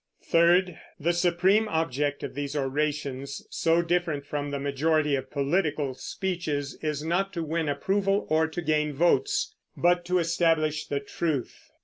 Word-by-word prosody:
Third, 175 +1 +3 0.2
the 170 +4 +1
supreme 180 +5 +3
object 145 -5 -1
of - - -5
these 145 0 -4
orations, 140 -1 -2
so 165 +1 +2
different 170 -4 0
from 145 0 -3
the 140 - -2
majority 150 +2 +1
of 130 -1 -4
political 145 -1 0
speeches, 150 -1 -3
is 150 -2 -2
not 190 +4 0
to 170 -2 -2
win 160 0 -1
approval 195 +7 +1
or 160 +1 +2
to 165 +2 -5
gain 150 -1 +1
votes, 405 - +2 0.2
but 175 0 +3
to 180 +1 +1
establish 165 -3 +1
the 140 -1 -2
truth. 145 -2 -3
155 Hz, 145 wpm, -27 LUFS, 145-175 Hz, 0.2 s, Third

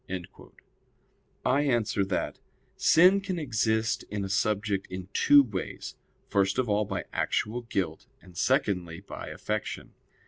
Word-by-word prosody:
I 140 +3 +3
answer 115 -7 +1
that, 95 -1 -2 0.4
Sin 185 +4 +5
can 190 -2 -3
exist 110 -6 0
in 100 -1 -3
a - - -5
subject 100 0 0
in 95 0 -7
two 145 -1 +6
ways: 105 -7 -5 0.3
first 100 +1 +1
of 130 -2 +1
all 105 0 +1
by - - -4
actual 115 +3 -1
guilt, 95 -8 -3
and 90 -2 -17
secondly 85 -2 0
by 100 - -8
affection. 105 0 -4
105 Hz, 130 wpm, -28 LUFS, 95-120 Hz, 0.4 s, two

